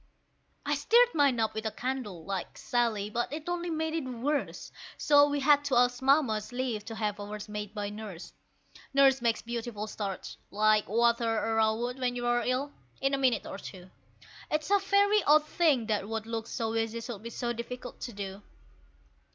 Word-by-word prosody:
I 290 - +1
stirred 465 - +4
mine 280 -5 +3
up 220 -1 +1
with 220 - -4
a - - -2
candle, 235 -11 -4
like 195 -2 -4
Sally, 230 -5 0
but 240 +3 -1
it 305 +2 -6
only 350 0 -2
made 320 -1 -1
it 310 -5 -2
worse; 275 +4 -2 0.3
So 290 0 +5
we 285 0 -1
had 290 +1 +5
to 275 -3 +1
ask 245 0 +3
Mamma's 260 -6 +2
leave 245 -4 -2
to 225 - -6
have 210 -2 -2
ours 205 +1 -6
made 210 0 -6
by 205 -1 -3
Nurse. 210 -5 -8 0.6
Nurse 270 -2 +5
makes 230 -1 +1
beautiful 230 -2 -4
starch 205 -3 -5
like 215 0 +2
water 235 +1 +2
arrowroot 225 +3 0
when 250 -1 0
you're 240 0 +1
ill 255 +4 -1 0.3
in 270 +1 0
a - - +3
minute 255 -3 +2
or 195 - -7
two. 185 -2 -10 0.6
It's 305 +4 -1
a 405 - +6
very 405 +2 +3
odd 300 +1 +5
thing 305 -7 +2
that 210 -2 -1
what 225 -1 -3
looks 230 0 -4
so 225 -1 -2
easy 225 0 -1
should 230 -3 -7
be 230 - -6
so 240 +1 -3
difficult 245 +1 -7
to 240 - -5
do! 200 -1 -6
240 Hz, 185 wpm, -29 LUFS, 215-275 Hz, 0.6 s, a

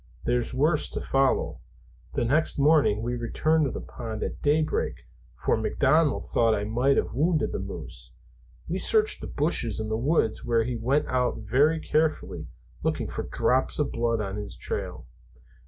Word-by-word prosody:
There's 120 0 0
worse 150 +4 +2
to - - -2
follow. 135 0 +1 0.6
The 120 - +1
next 150 +7 +2
morning 145 -7 +3
we 120 +1 -2
returned 155 +7 +1
to 135 - -2
the - - -5
pond 110 -3 -6
at - - -5
day 150 +2 +3
break, 155 - -1 0.4
for - - +1
McDonald 155 -2 +2
thought 115 -2 +2
I 100 - -2
might 125 +6 +2
have - - 0
wounded 155 +4 +1
the - - -3
moose. - - -7 0.6
We 180 +3 -2
searched 435 - +3
the - - -5
bushes 140 -8 0
and 110 0 -3
the 110 - +1
woods 125 -3 +1
where 115 -1 +2
he 125 +1 -3
went 130 +6 +1
out 125 -1 0
very 140 +9 +2
carefully, 155 0 -1 0.3
looking - - -1
for - - -4
drops 130 +1 0
of 150 - 0
blood 115 -1 0
on 100 -1 -4
his 105 -1 -6
trail." - - -4
130 Hz, 170 wpm, -26 LUFS, 115-155 Hz, 0.6 s, morning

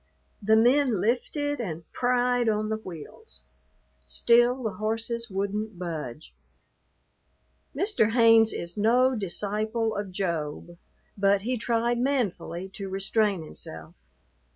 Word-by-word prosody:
The 220 +2 +4
men 245 0 +4
lifted 290 - -1
and 170 -6 -5
pried 245 -1 +1
on 215 0 0
the 220 - -1
wheels. 200 - -10 0.6
Still 240 +2 +3
the 220 - -1
horses 225 +2 -2
wouldn't 200 +1 -3
budge. 150 - -6 1.4
Mr. 305 - +1
Haynes 225 -2 +6
is 170 +2 -6
no 250 +5 +3
disciple 215 +3 -1
of 205 -2 -4
Job, 170 -2 -4 0.4
but 200 0 +2
he 250 +3 -1
tried 235 0 0
manfully 200 -9 -1
to 195 0 -7
restrain 195 -1 0
himself. 80 - -9
220 Hz, 110 wpm, -26 LUFS, 190-240 Hz, 1.4 s, Haynes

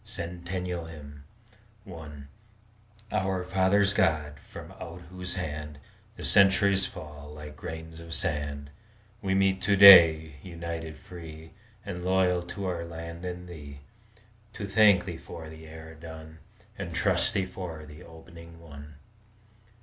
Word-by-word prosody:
CENTENNIAL 90 0 -5 1.0
HYMN 75 -6 -10 0.8
I - - -3
Our 95 -1 0
fathers' 95 +2 +3
God! 75 -7 +1
from - - -11
out 85 +1 -8
whose 90 -1 -5
hand 75 -4 -5 0.4
The - - -9
centuries 100 0 +4
fall 75 -1 -10
like 75 0 -9
grains 80 +1 -8
of 85 0 -11
sand, 70 -2 -3 0.5
We 95 -2 0
meet 95 -1 +2
to 100 - +2
day, 80 -6 +9
united, 85 -2 -6
free, 80 -2 -11 0.3
And 90 -3 -5
loyal 90 -1 +2
to 95 +3 -6
our 90 -2 -2
land 85 +1 -8
and 90 0 -6
Thee, 75 -5 -10 0.7
To 105 - -5
thank 100 -2 +5
Thee 90 -3 -5
for 80 -2 -9
the 80 0 -12
era 80 0 -10
done, 80 0 -11 0.4
And 85 -3 -5
trust 100 +4 +2
Thee 95 -2 +1
for 90 -4 -7
the 75 0 -12
opening 85 0 -13
one. 75 -2 -12
85 Hz, 135 wpm, -28 LUFS, 80-95 Hz, 1.0 s, day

